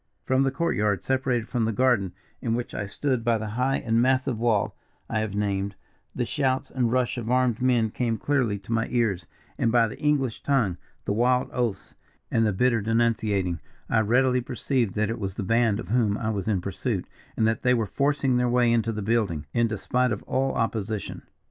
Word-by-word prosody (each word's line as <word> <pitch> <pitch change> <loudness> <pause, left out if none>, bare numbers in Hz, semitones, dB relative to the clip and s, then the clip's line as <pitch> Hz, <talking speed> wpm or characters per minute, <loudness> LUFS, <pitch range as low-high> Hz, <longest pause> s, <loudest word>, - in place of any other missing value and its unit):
"From 130 +1 +2
the 135 - +3
court 170 +5 -1
yard, 105 -3 0
separated 130 -3 0
from 120 -3 0
the 115 - 0
garden 110 -6 +2 0.3
in 115 -1 0
which 120 0 -4
I 105 - -3
stood 130 +2 -1
by 115 -1 +2
the 110 -1 -4
high 125 +5 0
and 115 0 +1
massive 130 -2 +1
wall 115 -3 +1 0.3
I 110 - -1
have 110 -2 -3
named, 100 -1 -1 0.4
the 125 - 0
shouts 130 0 -1
and 120 -3 0
rush 125 0 0
of 115 -1 -5
armed 125 -2 +2
men 120 -4 +2
came 115 -2 -1
clearly 125 -4 0
to 100 +3 -11
my 115 0 +1
ears; 115 -7 0 0.3
and, 115 - +2
by 115 -1 +4
the 105 - -9
English 140 -6 0
tongue, 115 -11 +1 0.3
the - - 0
wild 125 +3 +2
oaths, 115 -6 -2 0.4
and 115 -1 +3
the - - +2
bitter 115 +3 +2
denunciating, 110 -5 +1 0.3
I 115 - +4
readily 125 +4 +3
perceived 125 -3 -1
that 110 +1 0
it 115 - -4
was 95 -2 -4
the 110 - -3
band 115 +1 +2
of 115 - -7
whom 110 -3 +2
I 110 0 -1
was 100 -2 -3
in 100 -5 +1
pursuit, - - -3 0.3
and 110 - +2
that 115 0 0
they 125 0 +3
were 115 -2 0
forcing 135 +4 +1
their 125 0 +2
way 120 -1 +3
into 115 -1 +1
the 105 -2 -4
building, 100 -9 0
in 115 0 +3
despite 125 +3 0
of 105 - -3
all 135 +1 0
opposition. 110 -3 -2
115 Hz, 205 wpm, -26 LUFS, 105-125 Hz, 0.4 s, by